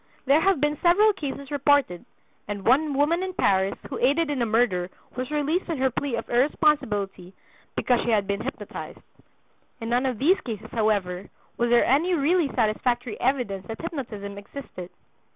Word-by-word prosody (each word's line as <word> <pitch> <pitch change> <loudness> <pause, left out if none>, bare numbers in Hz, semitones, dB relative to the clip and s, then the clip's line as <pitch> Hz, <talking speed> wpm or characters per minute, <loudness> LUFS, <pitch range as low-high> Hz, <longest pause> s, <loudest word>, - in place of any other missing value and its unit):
There 280 +4 +4
have 385 -3 +3
been 295 +1 0
several 410 +5 +5
cases 280 -5 -6
reported, 285 - +2 0.4
and 205 -1 -5
one 285 +4 +3
woman 305 +5 +2
in 375 -1 -4
Paris 195 - +2
who - - -5
aided 295 +5 +2
in 275 -4 -1
a 235 - +1
murder 215 -6 +1 0.3
was 255 0 -4
released 300 +5 -1
on 330 - -1
her 265 0 +1
plea 265 +1 -2
of 230 - -5
irresponsibility 220 - 0 0.4
because 245 -2 +2
she - - -2
had 210 -3 +2
been 200 +1 -2
hypnotized. - - -7 0.8
In 225 - -5
none 245 +2 +2
of 250 -3 -2
these 335 - +3
cases, 220 -2 -7
however, 200 -4 0 0.3
was 240 0 +1
there 240 0 +5
any 330 +8 +3
really 330 +2 +2
satisfactory 240 0 -1
evidence 240 -7 -1
that 225 - -6
hypnotism 215 -11 -6
existed. 200 -5 -9
255 Hz, 170 wpm, -25 LUFS, 215-295 Hz, 0.8 s, several